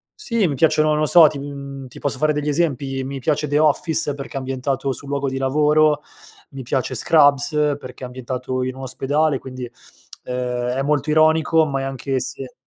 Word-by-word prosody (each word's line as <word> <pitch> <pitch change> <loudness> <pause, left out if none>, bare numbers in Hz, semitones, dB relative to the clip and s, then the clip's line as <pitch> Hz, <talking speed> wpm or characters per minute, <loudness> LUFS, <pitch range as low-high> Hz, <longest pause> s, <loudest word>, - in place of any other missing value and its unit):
sì, 230 - 0
mi 145 - -2
piacciono, 155 +1 +3
non 150 0 +1
lo 155 - +2
so, 165 +1 +7
to 145 -2 -4
mhmm, 140 -1 -8
ti - - -14
posso 140 -2 -2
fare 155 +3 +1
degli 150 0 -2
esempi, 140 -4 -1
mi 135 +1 -5
piace 150 +2 -1
The 145 +1 0
Office, 155 0 +2
perché 140 -1 -8
è - - -3
ambientato 135 +1 -2
sul 140 +2 -7
luogo 140 0 -2
di 135 - -4
lavoro, 150 +2 +2 0.5
mi 135 -1 -8
piace 130 +1 -2
Scrubs, 145 +1 +4 0.3
perché 130 -1 -11
è - - -2
ambientato 130 0 -4
in 130 0 -4
un 135 - -9
ospedale 135 +2 0
quindi 130 -2 -8 0.5
ehm, 125 -1 -3
è 135 - -1
molto 145 +1 0
ironico 160 +1 +3
ma 135 -2 -2
è - - -4
anche 135 0 -3
se 130 +1 -7
140 Hz, 200 wpm, -20 LUFS, 130-150 Hz, 0.5 s, so